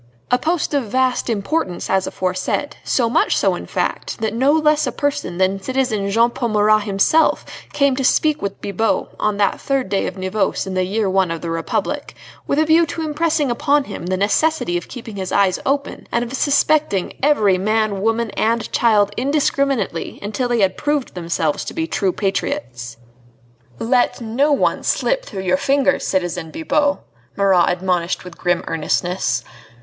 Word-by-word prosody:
A 250 - +4
post 330 -1 -1
of 280 -4 +1
vast 255 +3 0
importance 205 - -2
as 190 -1 +1
aforesaid; 185 +10 -2
so 240 -3 +1
much 250 - +2
so, - - +2
in - - -6
fact, - - -2
that 220 -1 -1
no 260 +5 +3
less 305 -1 +3
a - - -1
person 285 -11 -2
than 190 +1 +1
citizen 220 -4 -1
Jean 230 +4 +3
Paul 235 -1 -2
Marat 215 0 +3
himself 205 +11 +2 0.3
came 280 -2 +2
to 270 - -1
speak 305 +3 +2
with 200 -1 -4
Bibot 205 +3 -1
on 210 -1 0
that 200 -1 +1
third 270 -6 -1
day 195 0 0
of - - -6
Nivose 185 +2 -1
in 190 - -5
the 185 0 +1
year 205 +2 -1
I 190 -1 +4
of 165 -1 -4
the 170 - -4
Republic, 165 0 -3 0.3
with 280 - 0
a 310 - +3
view 325 +1 +4
to 325 - -4
impressing 305 -2 0
upon 285 +4 +2
him 195 -7 -7
the 185 0 0
necessity 205 - +1
of 175 - -3
keeping 230 -4 -9
his 190 -1 -4
eyes 195 -2 +2
open, 280 +1 -2
and 235 - +1
of 240 - -8
suspecting 285 -7 +1
every 215 -10 +3
man, 215 0 0
woman, 225 +1 0
and 230 +1 -1
child 210 -3 +3
indiscriminately 275 - 0
until 215 +5 -2
they 240 -2 +1
had 190 -1 +2
proved 295 -3 -1
themselves 165 -3 -1
to - - -7
be 325 -1 -1
true 195 - 0
patriots. 120 - -3 0.8
"Let 245 - +1
no 245 +6 +1
one 285 - +1
slip - - 0
through 190 - -6
your 185 0 +2
fingers, 280 +2 +1
citizen 175 -3 -1
Bibot," 295 - 0 0.4
Marat 190 -3 +3
admonished 180 -1 -1
with 180 -2 -10
grim 175 -1 0
earnestness. 155 -6 -1
220 Hz, 175 wpm, -19 LUFS, 190-280 Hz, 0.8 s, A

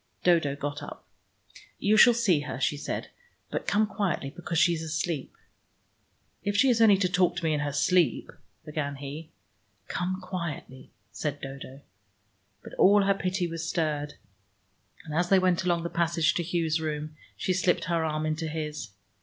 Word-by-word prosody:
Dodo 165 -6 +3
got 145 0 -4
up. - - -9 0.7
"You 210 +2 +2
shall 240 +2 +7
see 200 -9 +3
her," 145 -3 -5
she 145 - +1
said. 145 - -5 0.4
"But - - -3
come 215 +2 +3
quietly, 195 -9 -2
because 170 +1 -4
she 175 +1 +5
is 160 - -3
asleep." 155 -2 -3 1.1
"If 205 0 -1
she 265 +6 +5
is 230 -2 +3
only 210 -3 +7
to 190 -1 +2
talk 180 -1 +2
to - - -4
me 160 -1 +2
in 150 - 0
her 145 0 -1
sleep 165 -1 +2 0.2
" - - -41
began 150 -2 -3
he. 145 +3 -7 0.6
"Come 185 +1 -2
quietly," 170 -8 -6 0.2
said 145 -2 -3
Dodo. 135 0 -9 0.8
But - - -11
all 205 +1 +6
her 195 0 +3
pity 185 -1 -1
was 165 -1 -4
stirred, 150 -3 -1 0.9
and 155 - -7
as 175 +3 +1
they 195 - +6
went 185 -1 +2
along 170 -2 +1
the - - -1
passage 170 0 +2
to - - -1
Hugh's 165 -2 0
room, 155 0 -4 0.2
she 185 - 0
slipped 185 -1 +1
her 165 -1 0
arm 155 -1 -1
into 155 +1 -2
his. 150 -5 -4
165 Hz, 175 wpm, -27 LUFS, 150-185 Hz, 1.1 s, shall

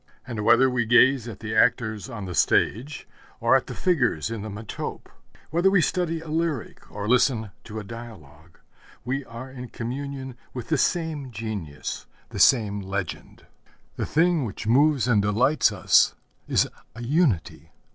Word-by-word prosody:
And 115 -4 -4
whether 125 +5 +5
we 125 -3 0
gaze 125 +1 +5
at 110 -4 -8
the 110 -1 -4
actors 110 -1 +2
on 110 -6 -6
the 90 - -5
stage 125 - +1 0.3
or 120 +2 +4
at 135 - +1
the - - -6
figures 125 - +1
in 115 -2 -4
the 110 - -6
metope, 105 +1 -6 0.5
whether 175 +4 +3
we 195 -1 +4
study 165 -1 0
a 160 - -11
lyric 160 -4 -3
or 105 0 -5
listen 115 -3 +2
to 110 0 -8
a 110 - -4
dialogue, 90 - -12 0.5
we 135 +3 -2
are 120 +3 -9
in 125 -2 -8
communion 130 +2 -5 0.2
with 120 -2 -6
the - - +2
same 160 -6 -1
genius, 100 -10 -6 0.2
the - - -6
same 105 -6 +4
legend. 95 -3 -5 0.5
The - - -3
thing 165 -1 +2
which 110 -2 -6
moves 135 +3 +3
and 110 -5 +4
delights 115 +9 +3
us - - +4 0.3
is - - +2 0.3
a 120 - -7
unity. 120 - 0
120 Hz, 160 wpm, -25 LUFS, 105-140 Hz, 0.5 s, whether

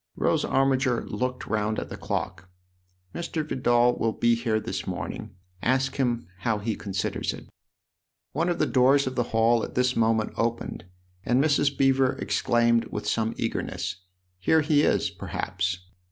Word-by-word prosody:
Rose - - +1
Armiger 135 -2 +1
looked 125 0 -3
round 110 0 -1
at - - -4
the - - -6
clock. 90 +1 -4 0.3
" 90 0 -40
Mr. 165 -2 -3
Vidal 120 -3 +3
will 115 -1 +1
be 120 0 +3
here 115 -2 0
this - - -5
morning. - - -5 0.3
Ask 130 +2 +1
him 120 -3 0
how 115 -3 0
he 105 +1 -2
considers 95 -2 -2
it." - - -12 0.8
One 165 +5 0
of 175 - 0
the - - +2
doors 135 +2 +4
of 130 - -2
the 120 -2 0
hall 115 +1 +3
at - - -6
this 125 0 +2
moment 110 -1 +1
opened, 115 -6 -2 0.4
and 125 +4 +2
Mrs. 145 -2 +2
Beever 135 -1 +3
exclaimed 120 -1 +2
with - - -5
some 115 -1 0
eagerness: 90 - -3 0.2
" 90 0 -46
Here 160 - +3
he 150 -1 +3
is, - - +2
perhaps 90 -1 -3
120 Hz, 165 wpm, -26 LUFS, 110-135 Hz, 0.8 s, doors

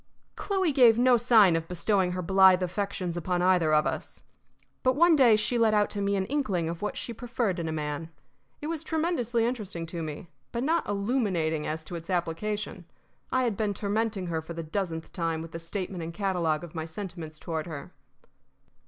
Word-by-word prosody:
Chloe 380 -5 0
gave 245 -5 +6
no 250 +1 +5
sign 225 -7 +5
of 165 0 -2
bestowing 180 +1 +1
her 180 0 -3
blithe 190 0 +5
affections 185 -1 -2
upon 175 +1 -1
either 180 -4 +3
of 155 0 +4
us. - - -4 0.6
But 255 0 +2
one 340 +2 +6
day 250 -6 +6
she 235 +3 0
let 220 -2 +4
out 210 -1 +2
to 205 - -3
me 200 0 +1
an 190 -1 0
inkling 205 - -1
of 165 0 -5
what 210 - -3
she 235 - -4
preferred 230 -5 -2
in 165 - -2
a - - -2
man. 150 +1 -3 0.5
It - - -5
was 320 0 -3
tremendously 310 -9 0
interesting 205 -8 -3
to 170 0 -5
me, 155 +1 -6 0.2
but 235 +1 -2
not 325 -1 +1
illuminating 200 - 0
as 160 +1 -3
to 175 - -8
its 165 +1 -8
application. 185 +2 -2 0.5
I 260 0 +2
had 235 -4 0
been 205 -1 -1
tormenting 205 -1 -1
her 165 -2 -2
for 165 +1 -8
the 165 - -4
dozenth 165 -1 -4
time 165 -3 -1
with 165 0 -8
the 165 - -6
statement 180 +1 -5
and 165 +1 -5
catalogue 170 -5 0
of 170 - -9
my 160 -2 -4
sentiments 165 -2 -7
toward 160 0 -4
her. 155 -4 -8
190 Hz, 195 wpm, -28 LUFS, 165-225 Hz, 0.6 s, gave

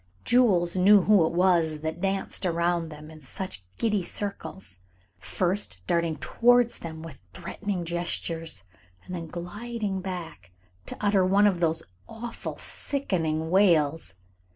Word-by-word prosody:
Jules 190 -9 +3
knew 195 +1 +6
who 200 -6 +5
it - - -3
was 170 -4 +2
that 160 +2 -4
danced 195 0 -1
around 170 -1 0
them 150 0 -10
in 155 -1 -13
such 145 - -6
giddy 210 -3 +1
circles, 190 - -5 0.4
first 180 - 0
darting 170 - +1
towards 240 - +3
them 160 -1 -7
with 165 -5 -10
threatening 200 -4 -4
gestures, 165 - -3 0.4
and 185 - -8
then 165 -2 -5
gliding 200 +4 -4
back 175 - -7 0.4
to - - -6
utter 200 -2 +3
one 195 +3 +4
of 190 -4 +3
those 165 -1 +1 0.3
awful, 230 +1 -6
sickening 165 - -1
wails. 165 - +3
175 Hz, 130 wpm, -27 LUFS, 160-200 Hz, 0.4 s, knew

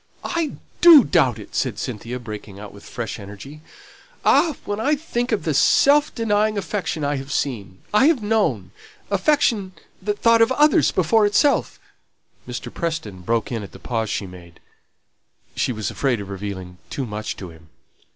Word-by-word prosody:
"I 335 -3 -1 0.3
do 330 -6 +10
doubt 135 - +2
it," - - -12
said - - -1
Cynthia, 115 +4 -5
breaking 105 -4 -9
out 105 -1 -10
with 100 - -14
fresh 120 -2 -5
energy. 105 +10 -10 0.6
"Ah! 320 -5 +4
when 205 +1 -3
I 290 +7 +2
think 255 -5 -3
of 220 - 0
the 160 - 0
self 285 - +4
denying 215 -1 +1
affection 185 -4 -3
I 145 0 0
have 135 +1 -7
seen 100 -11 -3
I 255 +7 +5
have 300 -9 +2
known 215 0 0 0.4
affection 230 -11 +1 0.3
that 205 +2 -2
thought 230 +1 +4
of 230 - +4
others 295 +2 +4
before 205 +5 +3
itself 280 +7 +2 0.3
" - - -38
Mr. - - -6
Preston 160 - -4
broke 115 +5 -1
in 115 -2 -2
at 100 - -10
the - - -10
pause 115 -3 -2
she 100 - -2
made. 90 -2 -13 1.0
She - - 0
was 110 -4 -3
afraid 130 -5 0
of 100 -1 -7
revealing 95 -2 -7
too 135 - -3
much 105 -1 -5
to 95 -3 -8
him. 80 -1 -18
145 Hz, 170 wpm, -22 LUFS, -, 1.0 s, do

